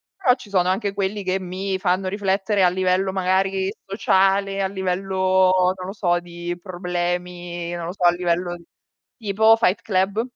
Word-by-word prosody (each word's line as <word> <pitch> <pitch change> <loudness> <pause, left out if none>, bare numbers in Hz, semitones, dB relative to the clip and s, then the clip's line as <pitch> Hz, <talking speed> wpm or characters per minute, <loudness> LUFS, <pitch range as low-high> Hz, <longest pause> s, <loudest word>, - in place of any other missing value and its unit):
Però 260 -10 +3
ci 210 - -14
sono 180 -2 +2
anche 195 +1 -1
quelli 200 +1 -2
che 185 +1 0
mi 190 +1 -4
fanno 185 0 0
riflettere 195 0 0
a 180 - +6
livello 185 +1 +1
magari 190 +1 0
sociale, 195 0 +1
a 190 - +1
livello, 185 -1 +1
non 185 -1 -7
lo 195 - -5
so, 175 -4 +1
di 175 0 -6
problemi, 175 -1 -4
non 170 -1 -4
lo 175 - -4
so 190 -2 -6
a 175 - +7
livello 175 0 -1 0.6
tipo 220 0 +4
Fight 200 -3 +1
Club. 200 +2 0
190 Hz, 160 wpm, -22 LUFS, 180-195 Hz, 0.6 s, a